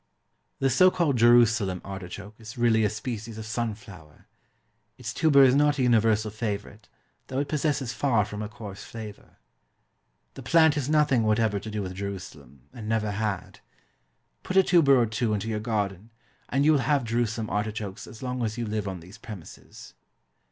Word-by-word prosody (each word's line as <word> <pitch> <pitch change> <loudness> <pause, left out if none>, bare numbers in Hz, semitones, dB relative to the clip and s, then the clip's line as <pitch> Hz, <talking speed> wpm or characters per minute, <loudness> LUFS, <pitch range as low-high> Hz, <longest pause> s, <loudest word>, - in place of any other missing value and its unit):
The 135 -1 +1
so 185 +9 +6
called 170 -7 +1
JERUSALEM 115 -5 +4
ARTICHOKE 95 +1 -8
is 110 +3 -10
really 115 -2 +3
a 105 - +3
species 110 0 -6
of 110 - -6
sunflower. 110 -8 -6 0.7
Its 120 -2 -6
tuber 145 -4 +5
is 130 -1 +6
not 145 +1 +3
a 130 - +1
universal 110 -3 +3
favourite, 105 -1 -5 0.4
though 130 - -5
it 140 +1 0
possesses 145 -5 -1
far 115 -2 +1
from 105 0 -6
a 105 - -4
coarse 110 -4 -9
flavour. 110 -3 -10 1.0
The - - -9
plant 160 -2 +4
has 145 -2 -2
nothing 150 -5 +3
whatever 110 -1 +1
to 110 - -8
do 105 -1 -3
with 95 -1 -5
Jerusalem, 90 -9 -8
and 110 -4 -7
never 110 -2 0
had. 100 -2 -3 0.8
Put 185 - -2
a 190 - +7
tuber 145 -8 +5
or 120 - +3
two 110 0 -1
into 105 +2 -3
your 110 -1 -1
garden, 105 -2 -3 0.4
and 140 +2 +1
you 155 - +6
will 150 - +4
have 140 +1 +1
Jerusalem 115 -1 -2
artichokes 105 -1 -3
as 115 - -11
long 125 -1 -3
as 110 0 -2
you 120 - -2
live 105 -1 -3
on 95 -3 -5
those 90 +5 -14
premises. 100 -8 -11
110 Hz, 175 wpm, -26 LUFS, 105-125 Hz, 1.0 s, a